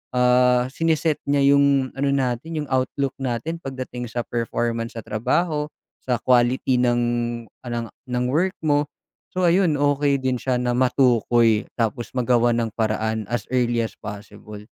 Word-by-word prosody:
ah, 125 0 +4
sini-set 160 -1 0
niya 140 -1 +4
yung 140 -2 +3
ano 140 0 +1
natin, 140 +4 -1
yung 150 - -11
outlook 130 +1 0
natin, 135 +7 -3
pagdating 130 -2 -6
sa 120 - -2
performance 115 0 -2
sa 115 - -5
trabaho, 150 +8 0 0.4
sa 125 -3 0
quality 125 0 +2
ng 120 -1 +2 1.1
ng 125 0 0
work 185 +7 +1
mo. 145 -1 +2 0.5
So, 185 - +1
ayun, 175 -2 +3
okey 145 0 +2
din 130 -1 0
siya 130 0 0
na 125 0 0
matukoy 120 -3 +3
tapos 120 +1 -1
magawan 120 -1 +2
ng 110 - -6
paraan, 110 0 -1
as 120 -3 -2
early 120 -2 +2
as 110 - -5
possible. 105 0 -9
125 Hz, 140 wpm, -22 LUFS, 120-140 Hz, 1.1 s, ah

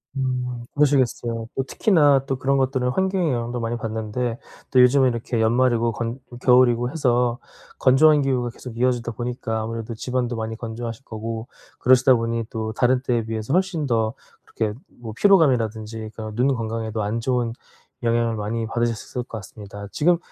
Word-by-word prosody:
음 125 -2 -2
그러시겠어요. 125 -5 +1
또 135 - 0
특히나 145 - +3
또 135 -1 -2
그런 135 +1 +1
것들은 130 -1 +1
환경의 190 0 +1
영향도 120 0 -3
많이 115 +1 -2
받는데 115 +2 -3 0.3
또 130 - +6
요즘은 130 +1 +5
이렇게 115 -1 -2
연말이고 120 0 +2
건 115 +3 -4
좀 120 - -11
겨울이고 125 -1 +4
해서 125 -5 +1 0.4
건조한 145 +3 +5
기후가 125 -3 0
계속 115 -1 -10
이어지다 120 -1 +1
보니까 120 0 -3
아무래도 115 +1 -5
집안도 125 +1 -2
많이 110 0 -4
건조하실 115 +1 -6
거고 115 +1 -5 0.3
그러시다 130 +1 +5
보니 115 0 -1
또 110 0 -4
다른 125 +2 +2
때에 120 -3 0
비해서 110 +3 -3
훨씬 180 -5 +1
더 115 -2 +1 0.5
이렇게 110 0 0 0.2
뭐 110 -3 -7
피로감이라든지 115 - +2
그런 110 -1 -6
눈 125 +3 +2
건강에도 115 -3 -2
안 110 +3 -1
좋은 120 -1 0 0.5
영향을 115 -1 +1
많이 110 +2 -2
받으셨을 120 +1 -2
것 - - -23
같습니다. 100 0 -10
지금 175 +3 +3
120 Hz, 385 characters per minute, -23 LUFS, 115-130 Hz, 0.5 s, 또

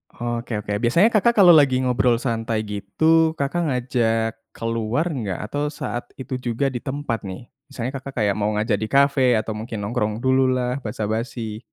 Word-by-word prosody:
Oke 120 -1 -3
oke, 105 0 -2
biasanya 170 - +4
Kakak 235 +3 +3
kalau 175 - +9
lagi 140 -5 +5
ngobrol 125 -1 +2
santai 115 -2 -2
gitu, 160 +11 +2
Kakak 160 +4 -1
ngajak 115 -3 0 0.2
keluar 115 +5 -1
enggak? 105 - -3
Atau 145 +7 -2
saat 120 -4 -5
itu 130 0 -5
juga 125 +3 -1
di 120 - -4
tempat 130 -7 -4
nih, 95 +6 -7 0.2
misalnya 130 -2 -4
Kakak 130 -4 -4
kayak 100 -1 +1
mau 105 - +1
ngajak 105 -1 0
di 110 - -2
cafe, 135 -2 +3
atau 110 0 -1
mungkin 110 0 -5
nongkrong 105 +2 -2
dulu 130 0 +3
lah 125 +1 -1
basa-basi. 110 0 -4
120 Hz, 170 wpm, -22 LUFS, 110-135 Hz, 0.2 s, kalau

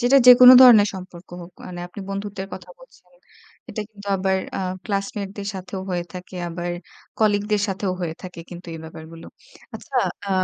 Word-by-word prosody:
যেটা 250 +3 +4
যেকোন 250 0 +10
ধরনের 220 -5 +8
সম্পর্ক 180 -1 -10
হোক। 175 +1 -13
মানে 175 -1 -8
আপনি 180 +3 -10
বন্ধুত্বের 195 -1 -5
কথা - - -12
বলছেন। - - -20 0.6
এটা 215 - -4
কিন্তু 205 -2 -15
আবার 190 0 0 0.2
আ - - -2 0.2
ক্লাসমেটদের 200 -1 -4
সাথেও 190 0 -6
হয়ে 175 -1 -2
থাকে, 180 +1 -9
আবার 175 +1 -5 0.5
কলিগদের 210 -1 +1
সাথেও 190 -1 -2
হয়ে 165 -3 -3
থাকে 180 -2 -9
কিন্তু 175 0 -10
এই - - -7
ব্যাপারগুলো। 160 +1 -11 0.5
আচ্ছা, - - -7 0.3
আ - - -3
195 Hz, 160 wpm, -22 LUFS, 180-205 Hz, 0.6 s, যেকোন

